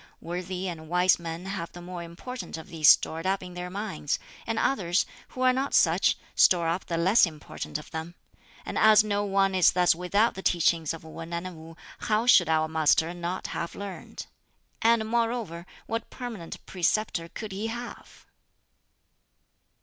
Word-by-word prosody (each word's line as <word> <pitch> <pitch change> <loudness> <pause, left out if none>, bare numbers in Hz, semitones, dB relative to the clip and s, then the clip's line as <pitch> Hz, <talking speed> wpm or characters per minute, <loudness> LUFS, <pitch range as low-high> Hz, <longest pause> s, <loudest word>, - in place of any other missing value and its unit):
Worthy 180 +2 -4
and 160 -3 -7
wise 180 +1 +4
men 170 +1 -6
have 190 -3 -5
the 175 - -9
more 175 0 -7
important 170 +8 -7
of 160 - -10
these 160 -3 +4
stored 165 +3 +4
up 190 0 0
in 180 -1 -9
their 180 0 -5
minds; 195 -7 -3 0.3
and 225 0 -1
others, 190 -8 +1 0.2
who 255 - -8
are 255 0 +5
not 270 +2 -1
such, - - +4 0.2
store 170 -2 +4
up 170 +3 -2
the 170 - -2
less 190 +5 +5
important 155 -1 -6
of 150 - -12
them; 160 +2 -6 0.5
and - - -3
as 215 -1 +7
no 205 -1 0
one 195 -1 +2
is 185 -2 +5
thus 180 -1 +4
without 190 +7 +1
the 190 - -7
teachings 170 -3 +2
of 165 - -7
Wan 165 +1 -9
and 175 +1 -4
Wu, 160 +1 -12 0.2
how 215 +1 0
should 180 -9 +6
our 155 -1 +2
Master 160 +1 +2
not 175 +1 -4
have 170 - -4
learned? 200 -2 -7 0.6
And 225 -1 +3
moreover 225 -7 -1 0.2
what 225 0 -4
permanent 230 -10 -8
preceptor 180 -1 -1
could 215 +2 -7
he 200 +4 -3
have?" 240 +1 -8
180 Hz, 170 wpm, -27 LUFS, 165-210 Hz, 0.6 s, as